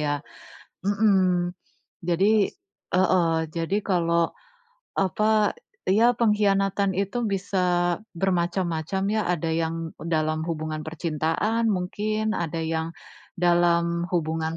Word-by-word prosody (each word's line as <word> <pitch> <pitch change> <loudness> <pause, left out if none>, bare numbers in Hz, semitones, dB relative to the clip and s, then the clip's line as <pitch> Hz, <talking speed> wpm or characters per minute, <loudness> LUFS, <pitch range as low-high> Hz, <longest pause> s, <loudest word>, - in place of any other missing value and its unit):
ya. 150 -1 0 0.8
Mhm, 190 -4 +3 0.6
jadi 200 +4 +3 0.5
heeh, 180 -3 +3 0.2
jadi 165 +4 -1
kalau 170 -3 +1 0.7
apa, 210 +3 +2 0.3
ya 220 +6 +5
pengkhianatan 200 -3 +2
itu 200 +5 -1
bisa 180 -3 +1 0.2
bermacam-macam, 175 -1 0
ya. 215 - +1
Ada 165 -2 -1
yang 165 0 0 0.3
dalam 155 -1 0
hubungan 155 -1 -3
percintaan 165 +8 -1
mungkin, 215 +3 -1
ada 165 -1 -2
yang 160 0 -2 0.5
dalam 170 0 +2
hubungan 160 -1 -1
175 Hz, 95 wpm, -25 LUFS, 165-200 Hz, 0.8 s, ya